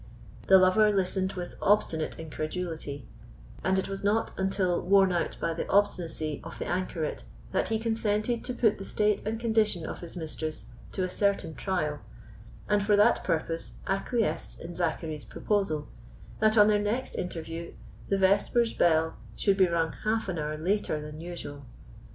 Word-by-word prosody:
The 190 - +9
lover 190 +3 +5
listened 190 -1 0
with 180 -2 -6
obstinate 190 -6 +2
incredulity; 155 -3 -4 0.6
and 190 0 +2
it 190 - 0
was 195 0 -5
not 210 +3 +1
until 190 -2 +1
worn 195 0 +5
out 175 -1 -1
by 165 - 0
the 165 - -4
obstinacy 170 -6 +1
of 165 - -8
the - - -4
anchoret 175 -3 -2 0.3
that - - 0
he 225 - +1
consented 225 0 0
to 250 - -2
put 220 -5 +2
the - - -5
state 210 +1 +1
and 220 +1 -2
condition 220 -7 +1
of - - -5
his 170 0 -5
mistress 155 -2 -4 0.3
to 190 - -1
a - - +1
certain 195 -3 0
trial, 155 -5 -2 0.7
and 205 -1 +3
for 205 0 +4
that 210 +3 +4
purpose 165 0 -2
acquiesced 215 +4 -1
in 170 +1 -7
Zachary's 160 -3 -2
proposal 195 -8 -1 0.5
that 215 +1 +4
on 210 0 +8
their 210 -1 +3
next 225 +5 -2
interview 165 -1 -5 0.4
the 195 - +2
vespers 200 +5 +3
bell 160 -1 +2 0.2
should 200 -2 +3
be 190 -1 +5
rung 165 -1 0
half 220 0 0
an 180 -4 -2
hour 150 0 -2
later 180 -1 0
than 150 +1 -8
usual. 165 -5 -7
185 Hz, 165 wpm, -28 LUFS, 165-205 Hz, 0.7 s, The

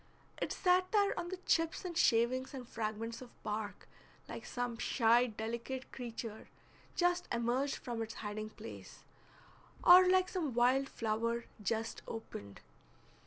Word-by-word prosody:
It - - -1
sat 365 0 +3
there 405 -2 +4
on 345 0 -4
the 375 - -4
chips 330 +3 +1
and 350 -2 -4
shavings 255 0 +3
and 250 -3 -7
fragments 225 +1 -4
of 250 - -9
bark 210 0 -4 0.4
like - - -7
some 245 -1 -3
shy 240 0 +4
delicate 235 +4 -5
creature 230 -3 -6 0.5
just 355 0 +2
emerged 240 +4 +1
from 235 -2 -4
its 225 0 -5
hiding 215 0 -4
place, 220 +1 -10 0.8
or 365 +1 +9
like 370 0 +4
some 315 - -2
wild 255 +3 +3
flower 230 +1 -1 0.2
just 225 +2 -2
opened. 100 - -7
240 Hz, 135 wpm, -35 LUFS, 225-305 Hz, 0.8 s, or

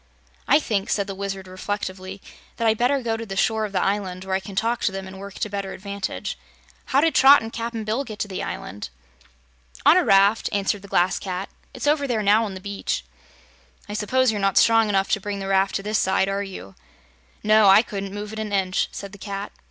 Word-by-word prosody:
"I - - +6
think," 210 -8 -2
said 200 - +1
the 195 - -5
Wizard 195 -1 -5
reflectively, 190 0 -5 0.3
"that 230 - +1
I'd 220 -1 +2
better 260 +2 +2
go 225 -1 -1
to 230 - -5
the 195 -3 -6
shore 220 +2 +1
of 210 - -6
the 195 - 0
island, 190 -2 -2
where 190 - -3
I - - +1
can 195 0 -10
talk 230 +4 0
to - - +1
them 195 0 -5
and 190 0 -10
work 200 0 -9
to - - -2
better 200 -1 -4
advantage. 195 - -5 0.5
How 275 - +2
did 325 +1 +2
Trot 270 -2 +7
and 225 - -7
Cap'n 230 -1 -4
Bill 220 +6 -1
get 215 -6 -8
to 210 - -2
the 190 -2 -5
island?" 100 -7 -6 1.0
"On - - +8
a - - +4
raft," 200 +3 +4
answered 200 0 0
the 200 - -12
Glass 180 -1 +2
Cat. 185 0 -4 0.3
"It's 255 - -5
over 290 -1 +2
there 225 -4 0
now 210 +3 +4
on 195 -3 -6
the - - -7
beach." 200 +1 -3 0.8
"I 205 - -6
suppose 245 +4 +2
you're 210 -2 -3
not 195 -1 +1
strong 225 -1 +5
enough 195 -1 +1
to 210 - +1
bring 205 +1 -4
the 195 - -5
raft 195 0 +2
to 195 - -2
this 215 +1 0
side, 190 0 +2
are 195 +1 -1
you?" 185 - -8 0.7
"No; 215 0 +5
I 195 +3 +7
couldn't 200 -3 -5
move 205 +1 -6
it 220 - -5
an 215 -1 -4
inch," 190 -2 +1
said 200 -1 -7
the 200 - -13
Cat. 200 0 -5
200 Hz, 230 wpm, -23 LUFS, 195-220 Hz, 1.0 s, On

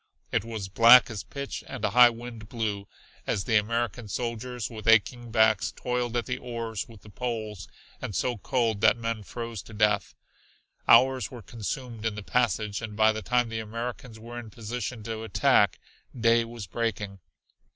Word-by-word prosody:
It - - +1
was 110 -4 -5
black 115 +5 +7
as 105 - -4
pitch 140 -1 -6
and 135 - -4
a - - 0
high 120 0 +8
wind 115 -2 -9
blew, 105 -4 -3 0.4
as 95 - 0
the 115 - 0
American 115 +2 -1
soldiers 120 +2 -3
with 115 -2 -8
aching 115 +2 +3
backs 110 -2 +3
toiled 125 -1 -2
at 120 - -1
the 125 - -3
oars 115 -3 -4
and 115 - -12
the 105 - -14
poles 110 -6 -4 0.3
and 100 - -5
so 125 - 0
cold 115 -3 0
that 115 - +5
men 115 -1 -3
froze 115 +1 -6
to 110 - -13
death. 105 0 +1 0.7
Hours 130 -3 +5
were 120 -3 -10
consumed 115 0 -5
in 110 -2 -1
the 105 - -6
passage, 110 -3 0
and 110 -2 -6
by 110 0 +5
the 110 0 -4
time 120 +1 +1
the 115 0 -3
Americans 115 +1 -6
were 120 +2 -8
in 115 -2 -9
position 115 +1 -5
to 110 0 -5
attack, 110 -3 +3 0.4
day 115 0 +4
was 115 -2 -8
breaking. 105 -1 -3
115 Hz, 175 wpm, -27 LUFS, 110-120 Hz, 0.7 s, high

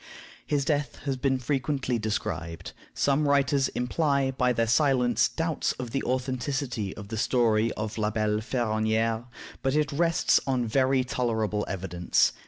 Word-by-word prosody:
His 145 -2 0
death 145 -1 0
has 135 -2 0
been 130 0 +1
frequently 130 -1 -1
described. 90 -6 -3 0.2
Some 145 +1 +2
writers 140 -1 +3
imply, 140 +1 0
by 125 -1 +1
their 115 -1 +1
silence, 125 0 +3
doubts 165 -2 -1
of 125 -2 -6
the 135 - -1
authenticity 130 -4 -2
of 105 -2 -9
the 110 - -4
story 115 -2 +2
of 110 +1 -4
La 105 0 +1
Belle 105 -1 0
Ferronnière; 110 0 0 0.4
but 135 +1 0
it 150 -1 +1
rests 165 +3 +3
on 130 -3 +1
very 130 +3 +2
tolerable 110 -4 -1
evidence. 90 -2 +1
125 Hz, 145 wpm, -27 LUFS, 110-135 Hz, 0.4 s, writers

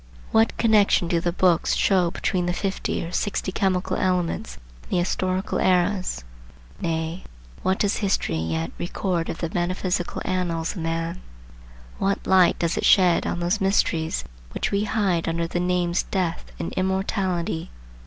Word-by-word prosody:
What 225 +1 +3
connection 210 -5 +4
do 170 0 +1
the 175 +1 0
books 175 -1 +2
show 185 -3 +3
between 180 +1 -1
the 175 - 0
fifty 195 -3 -2
or 170 - -7
sixty 195 0 -1
chemical 185 -1 0
elements 180 +3 -1 0.2
and - - -19
the - - +3
historical 185 +1 -1
eras? 185 - +1 0.6
Nay, 165 +1 -2 0.4
what 190 +1 +1
does 205 -1 +1
history 195 - 0
yet 80 0 -2
record 175 -1 -2
of - - -3
the 165 -1 -3
metaphysical 180 0 -1
annals 170 -3 -1
of 185 - -6
man? 165 +2 -2 0.8
What 195 0 0
light 185 -2 +5
does 170 -1 0
it - - -1
shed 180 -4 +5
on 175 - -2
those 180 +5 0
mysteries 170 -4 +1 0.3
which - - -1
we 200 +1 +1
hide 200 -6 0
under 165 0 -1
the 170 +1 -2
names 180 -1 +1
Death 180 -4 -3
and - - -4
Immortality? 185 -3 -1
180 Hz, 155 wpm, -24 LUFS, 170-190 Hz, 0.8 s, light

